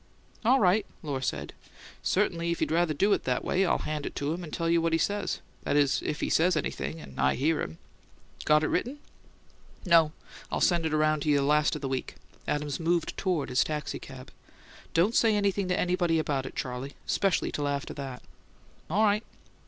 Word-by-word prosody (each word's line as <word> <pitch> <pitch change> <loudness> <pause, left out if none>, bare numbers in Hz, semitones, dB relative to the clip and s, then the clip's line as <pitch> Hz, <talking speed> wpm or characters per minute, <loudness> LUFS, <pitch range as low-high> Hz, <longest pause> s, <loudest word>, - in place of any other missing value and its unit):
"All 255 +4 +5
right," 200 +2 +4 0.2
Lohr 140 -4 -3
said. 70 - -3 0.5
"Certainly 170 -4 0
if 170 - -1
you'd - - 0
rather 165 -1 +2
do 200 +7 +3
it - - 0
that - - 0
way, 190 - +2
I'll - - +3
hand 150 -1 -3
it - - -7
to 145 +2 -1
him 175 +1 -5
and 155 - -8
tell 165 - -2
you 170 0 +3
what 165 0 0
he - - +4
says; 205 +5 -1 0.2
that - - -1
is, 140 -2 +3
if 150 - -3
he - - 0
says 175 +1 +3
anything 70 - -3
and 70 -3 -11
I 65 0 +3
hear 155 +5 +1
him. 80 - -5 0.7
Got 150 0 +4
it - - +1
written?" 250 +10 -1 0.9
"No; 165 -3 +5 0.4
I'll - - 0
send 170 -2 +3
it 155 - -3
around 155 0 +2
to 155 - -1
you 145 -1 +4
last 150 +1 +3
of - - -7
the - - 0
week." 130 -1 -3 0.3
Adams 145 -1 -1
moved 170 0 0
toward 175 -8 -1
his 125 0 +3
taxicab. 140 -3 -6 0.6
"Don't 180 +7 +3
say 225 -3 +4
anything 200 -1 +1
to 180 - 0
anybody 175 -2 +1
about 140 -4 -1
it, - - -10
Charley, 130 +2 -4
especially 195 -3 +1
till 145 -1 -2
after 140 0 -2
that." 135 -3 -7 0.7
"All 200 +7 +2
right." 210 +1 +3
155 Hz, 200 wpm, -28 LUFS, 140-180 Hz, 0.9 s, All